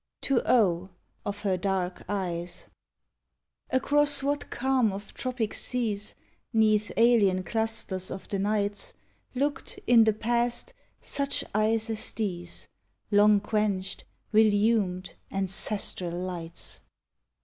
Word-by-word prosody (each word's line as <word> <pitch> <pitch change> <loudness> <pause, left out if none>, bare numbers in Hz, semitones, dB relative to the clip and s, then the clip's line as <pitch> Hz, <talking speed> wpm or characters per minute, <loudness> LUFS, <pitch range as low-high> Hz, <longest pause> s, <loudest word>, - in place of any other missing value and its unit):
TO 270 -3 +1
O—, 185 -6 +3 0.4
OF 205 0 -4
HER 190 -3 +1
DARK 185 -1 -1
EYES 175 -4 -3 1.0
Across 290 +1 +3
what 285 +1 -1
calm 260 -4 +1
of 200 +1 -7
tropic 250 -4 -2
seas, 215 -5 -1 0.4
'Neath 215 -1 +3
alien 210 -6 +4
clusters 220 -4 -1
of 190 - -7
the 200 - -1
nights, 205 0 0 0.4
Looked, 280 +2 -2
in 235 -2 +6
the 220 - +4
past, 235 +2 -1 0.3
such 280 0 0
eyes 220 +1 +2
as 220 - -1
these? 175 -6 -3 0.4
Long 205 0 +6
quenched, 200 -2 -1 0.3
relumed, 210 -3 +3 0.2
ancestral 195 -1 -1
lights! 175 -2 -5
210 Hz, 105 wpm, -28 LUFS, 190-230 Hz, 1.0 s, in